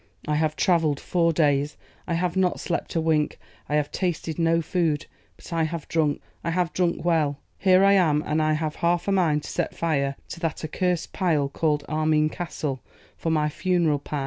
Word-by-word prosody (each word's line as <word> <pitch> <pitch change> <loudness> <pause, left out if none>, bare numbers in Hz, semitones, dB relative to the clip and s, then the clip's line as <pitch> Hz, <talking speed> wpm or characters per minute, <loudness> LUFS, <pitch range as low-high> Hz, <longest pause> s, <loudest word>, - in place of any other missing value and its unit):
'I 150 0 +1
have 155 0 +1
travelled 165 -6 +2
four 170 -2 +1
days, 145 -2 +1 0.3
I 170 - 0
have 175 +1 -1
not 185 -1 +1
slept 175 - -3
a - - +3
wink, 160 -2 +1 0.3
I 150 - +1
have 150 -1 0
tasted 170 -3 -2
no 165 0 +3
food; 165 -2 0 0.3
but - - -10
I 165 - +1
have 165 -1 -5
drunk, 155 -3 0 0.2
I 170 - -1
have 175 0 0
drunk 175 -2 0
well. 155 -5 +2 0.2
Here 185 0 +5
I 200 0 +6
am, 155 -6 +3
and 155 +1 +1
I 155 0 +2
have 155 0 -2
half 170 +2 +1
a - - +2
mind 160 -6 +2
to - - -7
set - - -2
fire 140 -4 0
to 170 - -7
that 165 -2 -3
accursed 180 +2 -1
pile 155 -7 +1
called 150 -1 0
Armine 155 0 +2
Castle 150 -6 -4 0.3
for 165 - -3
my 155 -2 +2
funeral 165 -2 +1
pyre. 145 +1 -4
160 Hz, 200 wpm, -25 LUFS, 150-175 Hz, 0.3 s, I